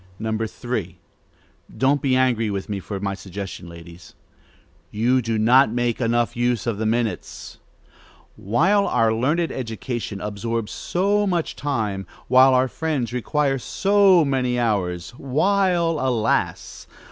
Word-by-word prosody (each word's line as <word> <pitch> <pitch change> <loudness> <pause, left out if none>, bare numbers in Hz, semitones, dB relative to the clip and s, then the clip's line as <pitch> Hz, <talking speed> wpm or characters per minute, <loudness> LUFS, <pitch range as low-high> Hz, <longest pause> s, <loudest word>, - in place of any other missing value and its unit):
3. 105 -7 -5 0.8
Don't 140 +2 +2
be 135 -3 +2
angry 120 -4 +2
with 100 -1 -4
me 100 -1 -3
for 100 +1 -6
my 100 0 -2
suggestion, 95 -2 -8
ladies: 85 0 -13 0.7
you 120 +5 +1
do 115 -1 -2
not 120 +3 +5
make 120 0 -1
enough 120 0 +1
use 120 -1 0
of 115 -4 -2
the 110 - 0
minutes. 115 0 -3 0.8
While 185 - +2
our 115 -1 +2
learned 150 +9 0
education 115 -3 -5
absorbs 105 +2 -3
so 200 +3 0
much 175 -4 -1
time, 110 -9 -3 0.2
while 130 +1 +6
our 130 +1 +3
friends 140 -5 -3
require 135 +2 0
so 195 +2 +3
many 130 -3 0
hours, 90 -7 -1
while, 170 +3 +1
alas! 125 -4 -1
120 Hz, 125 wpm, -22 LUFS, 105-140 Hz, 0.8 s, while